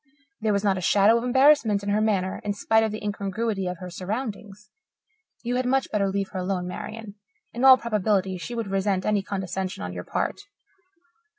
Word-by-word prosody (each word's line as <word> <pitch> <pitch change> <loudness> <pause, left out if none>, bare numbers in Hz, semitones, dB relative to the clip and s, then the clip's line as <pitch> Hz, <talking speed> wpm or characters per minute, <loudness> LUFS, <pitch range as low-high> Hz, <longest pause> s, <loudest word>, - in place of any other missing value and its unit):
There 220 -1 0
was 200 0 0
not 195 -2 +2
a - - -6
shadow 200 +4 +4
of - - -6
embarrassment 250 -5 +4
in 205 - -3
her 210 +1 +2
manner, 195 -4 0
in 205 - -1
spite 220 +2 +2
of 220 - 0
the 215 0 -6
incongruity 205 0 -2
of 180 0 -4
her 180 +1 -8
surroundings. 210 +1 -6 0.7
You 245 +1 -1
had 255 0 -1
much 265 +1 +1
better 200 -2 +1
leave 195 0 -2
her 190 - -5
alone, 180 -1 -2
Marian. 210 +2 -7 0.4
In 240 - -3
all 265 -1 +9
probability 205 -5 0
she 240 +7 -6
would 230 -1 -2
resent 195 -1 0
any 210 -1 +2
condescension 190 - -4
on 90 0 -5
your 90 0 -6
part. - - -3
205 Hz, 195 wpm, -25 LUFS, 190-225 Hz, 0.7 s, all